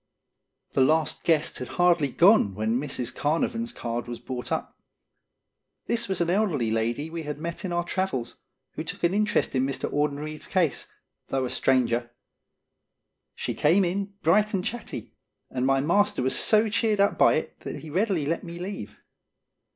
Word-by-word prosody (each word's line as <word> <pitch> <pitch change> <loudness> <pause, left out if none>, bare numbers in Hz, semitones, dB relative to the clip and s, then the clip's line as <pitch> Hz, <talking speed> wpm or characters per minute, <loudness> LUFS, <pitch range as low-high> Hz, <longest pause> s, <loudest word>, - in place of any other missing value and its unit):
The - - +2
last 155 +3 +2
guest 160 -3 +1
had 125 - -5
hardly 175 -4 +4
gone 170 - +5
when 110 +3 0
Mrs. 135 -4 -3
Carnavon's 230 +10 -1
card 120 - -4
was 120 -1 -5
brought 125 -1 -6
up. - - -2 1.1
This 235 0 0
was 190 - -1
an 170 -1 +1
elderly 170 - +1
lady 120 +8 -1
we 165 0 -4
had 150 -2 -5
met 170 +4 -5
in 185 - -3
our 175 0 0
travels, 175 -10 -2 0.3
who - - -5
took - - -7
an 170 +2 +3
interest 210 +1 +1
in 130 -1 +2
Mr. 135 0 -2
Audenried's 150 +1 -2
case, 175 -6 0 0.4
though 135 -1 -1
a 125 - -4
stranger. 120 -2 +1 1.3
She - - -3
came 180 +6 +3
in, 200 +3 -3
bright 210 +6 +3
and 185 - -2
chatty, 240 0 -5 0.4
and 130 0 0
my 135 0 +3
master 175 -1 +2
was 130 - +1
so 215 0 +4
cheered 215 -1 +1
up 200 0 +2
by - - +6
it - - -4
that - - -6
he 155 - -8
readily 185 -3 +1
let 165 +3 -1
me 170 0 -7
leave. 175 - -6
160 Hz, 170 wpm, -26 LUFS, 130-190 Hz, 1.3 s, by